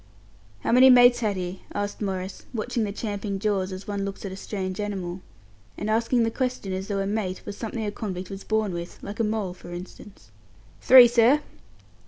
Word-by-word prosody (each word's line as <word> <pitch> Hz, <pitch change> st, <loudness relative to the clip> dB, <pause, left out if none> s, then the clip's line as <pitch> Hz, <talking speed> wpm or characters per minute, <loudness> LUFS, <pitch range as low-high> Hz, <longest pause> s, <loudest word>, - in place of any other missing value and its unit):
"How -, -, -1 dB
many 255 Hz, +2 st, +8 dB
mates 245 Hz, -1 st, +7 dB
had 215 Hz, -4 st, 0 dB
he?" 180 Hz, +1 st, -5 dB
asked 205 Hz, +1 st, -3 dB
Maurice, 190 Hz, -2 st, -4 dB
watching 230 Hz, 0 st, -1 dB
the 200 Hz, -, -3 dB
champing 205 Hz, -1 st, -4 dB
jaws 195 Hz, -2 st, -1 dB
as 185 Hz, +1 st, -8 dB
one 200 Hz, -1 st, -2 dB
looks 200 Hz, +1 st, -5 dB
at 195 Hz, -, -4 dB
a -, -, -6 dB
strange 190 Hz, -1 st, -5 dB
animal, 190 Hz, -3 st, -4 dB, 0.6 s
and 215 Hz, -, -2 dB
asking 230 Hz, +2 st, +2 dB
the 225 Hz, -, 0 dB
question 250 Hz, -6 st, -2 dB
as 190 Hz, +1 st, -4 dB
though 200 Hz, -, -2 dB
a -, -, -1 dB
"mate" 195 Hz, -2 st, -3 dB
was 205 Hz, -, -6 dB
something 225 Hz, 0 st, -4 dB
a 205 Hz, -, -2 dB
convict 190 Hz, -3 st, -5 dB
was 195 Hz, 0 st, -7 dB
born 220 Hz, -3 st, 0 dB
with 170 Hz, 0 st, -6 dB
like 205 Hz, +3 st, -7 dB
a -, -, +3 dB
mole, 210 Hz, -4 st, -1 dB
for 175 Hz, -, -12 dB
instance. 185 Hz, +3 st, -10 dB, 0.5 s
"Three, 255 Hz, -2 st, +9 dB
sir." 240 Hz, +5 st, +4 dB
205 Hz, 200 wpm, -25 LUFS, 190-225 Hz, 0.6 s, Three